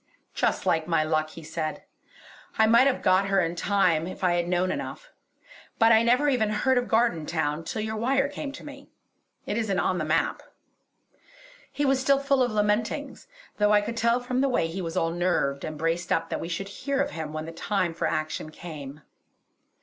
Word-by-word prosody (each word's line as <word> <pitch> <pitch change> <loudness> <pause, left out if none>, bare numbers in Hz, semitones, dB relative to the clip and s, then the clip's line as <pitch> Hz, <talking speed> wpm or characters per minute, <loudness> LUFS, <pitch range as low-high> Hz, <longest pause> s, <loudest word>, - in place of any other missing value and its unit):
"Just - - 0
like 160 -1 +1
my 165 -2 +2
luck!" 155 0 0
he 165 +1 -11
said, 155 0 -4 0.7
"I 220 - +5
might 235 +4 +5
have 270 - 0
got 185 +1 +3
her 195 0 +2
in 170 -1 0
time 175 -4 +1
if 185 - -8
I 180 -1 +3
had 175 0 0
known 180 +1 +1
enough; - - -6 0.7
but 225 0 +5
I 220 0 +6
never 250 +5 +3
even 245 -7 +2
heard 250 +5 +2
of 245 - -4
Gardentown 165 -8 0
till 215 +6 -4
your 220 0 -3
wire 270 +5 +1
came 290 0 -6
to - - -10
me. 280 -1 -11 0.6
It 205 - -2
isn't 205 -4 -1
on 180 - 0
the - - -1
map." 155 +2 0 1.3
He 290 - -1
was 270 -1 +3
still 275 +1 +3
full 275 -1 +1
of 245 -2 +2
lamentings, 210 - -1 0.3
though 210 0 +3
I 205 - +5
could 230 +3 -4
tell 235 +1 +2
from 250 +1 -1
the 275 - +2
way 250 - +1
he 165 +4 -4
was 165 -2 -4
all 165 - +1
nerved 170 -6 0
and 155 - -5
braced 165 +2 -1
up 165 - 0
that - - -2
we 165 - -5
should 195 +3 -4
hear 275 +6 -3
of 285 +1 0
him 160 -2 -5
when 155 0 -5
the 165 - -7
time 175 0 -1
for 165 - -1
action 155 0 -3
came. 155 -3 -9
195 Hz, 205 wpm, -26 LUFS, 165-240 Hz, 1.3 s, I